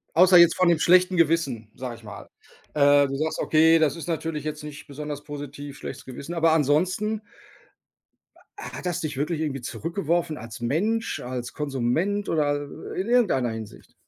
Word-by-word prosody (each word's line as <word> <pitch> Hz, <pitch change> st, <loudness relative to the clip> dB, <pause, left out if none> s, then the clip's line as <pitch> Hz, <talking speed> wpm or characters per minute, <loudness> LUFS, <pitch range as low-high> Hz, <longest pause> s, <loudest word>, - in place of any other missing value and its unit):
Außer 180 Hz, +2 st, +7 dB
jetzt 170 Hz, -1 st, +7 dB
von 185 Hz, -1 st, +3 dB
dem 170 Hz, -2 st, +3 dB
schlechten 180 Hz, +1 st, +4 dB
Gewissen, 145 Hz, -9 st, +1 dB
sage 125 Hz, -2 st, -6 dB
ich 115 Hz, -, -17 dB
mal. 105 Hz, -3 st, -10 dB, 0.5 s
Äh, 145 Hz, -1 st, +5 dB
du 135 Hz, -, -4 dB
sagst: 155 Hz, +3 st, -2 dB
„Okay, 160 Hz, +1 st, +4 dB
das 155 Hz, -1 st, +2 dB
ist 165 Hz, -2 st, -8 dB
natürlich 160 Hz, -2 st, -3 dB
jetzt 150 Hz, -1 st, -5 dB
nicht 150 Hz, +1 st, -9 dB
besonders 145 Hz, 0 st, -6 dB
positiv, 145 Hz, -1 st, -8 dB
schlechtes -, -, -8 dB
Gewissen”, 140 Hz, +5 st, -7 dB
aber 165 Hz, -1 st, +3 dB
ansonsten 180 Hz, +9 st, +1 dB, 1.4 s
hat 180 Hz, -, -7 dB
das 175 Hz, 0 st, -2 dB
dich 150 Hz, -4 st, -4 dB
wirklich 155 Hz, +2 st, -1 dB
irgendwie 135 Hz, -4 st, -2 dB
zurückgeworfen, 165 Hz, +3 st, -2 dB
als 115 Hz, 0 st, -9 dB
Mensch, 210 Hz, -, 0 dB
als 125 Hz, -1 st, -5 dB
Konsument 150 Hz, +9 st, -1 dB
oder 145 Hz, -2 st, +1 dB, 0.4 s
i -, -, 0 dB
in 195 Hz, -, -5 dB
irgendeiner 210 Hz, -, +2 dB
Hinsicht? 110 Hz, -2 st, -9 dB
155 Hz, 165 wpm, -25 LUFS, 140-170 Hz, 1.4 s, Außer